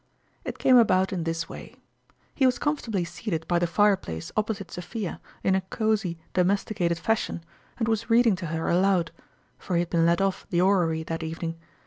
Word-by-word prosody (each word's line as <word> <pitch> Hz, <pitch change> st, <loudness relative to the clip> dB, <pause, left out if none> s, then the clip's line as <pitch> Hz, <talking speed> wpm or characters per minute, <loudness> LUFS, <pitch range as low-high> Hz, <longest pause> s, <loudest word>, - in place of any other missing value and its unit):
It -, -, -5 dB
came 255 Hz, -1 st, +5 dB
about 190 Hz, -5 st, +4 dB
in 170 Hz, -3 st, -2 dB
this 165 Hz, 0 st, -2 dB
way. -, -, -10 dB, 0.6 s
He 265 Hz, -, +3 dB
was 250 Hz, -, +1 dB
com 295 Hz, 0 st, +1 dB
fortably 210 Hz, -10 st, -3 dB
seated 165 Hz, -3 st, -4 dB
by 175 Hz, -1 st, +2 dB
the 175 Hz, -, +1 dB
fireplace 185 Hz, -, +1 dB
opposite 210 Hz, -2 st, -2 dB
Sophia 180 Hz, +2 st, -5 dB, 0.2 s
in 190 Hz, -, +3 dB
a 190 Hz, -, +2 dB
cosy, 205 Hz, -2 st, -1 dB, 0.2 s
domesticated 180 Hz, -2 st, +1 dB
fashion, 210 Hz, -3 st, -1 dB, 0.3 s
and 225 Hz, -, -1 dB
was 225 Hz, +1 st, -1 dB
read 235 Hz, +2 st, +5 dB
ing 220 Hz, -4 st, +4 dB
to 175 Hz, -3 st, -5 dB
her 160 Hz, +1 st, -3 dB
aloud; 180 Hz, -1 st, +2 dB, 0.5 s
for 180 Hz, -, -3 dB
he 170 Hz, -, +3 dB
had 175 Hz, -, -4 dB
been 165 Hz, -1 st, +3 dB
let 170 Hz, +2 st, +3 dB
off 195 Hz, -1 st, -1 dB
the 175 Hz, -, +1 dB
orrery 175 Hz, -4 st, +2 dB
that 165 Hz, +1 st, -4 dB
evening. 165 Hz, +1 st, -4 dB
185 Hz, 190 wpm, -26 LUFS, 170-215 Hz, 0.6 s, came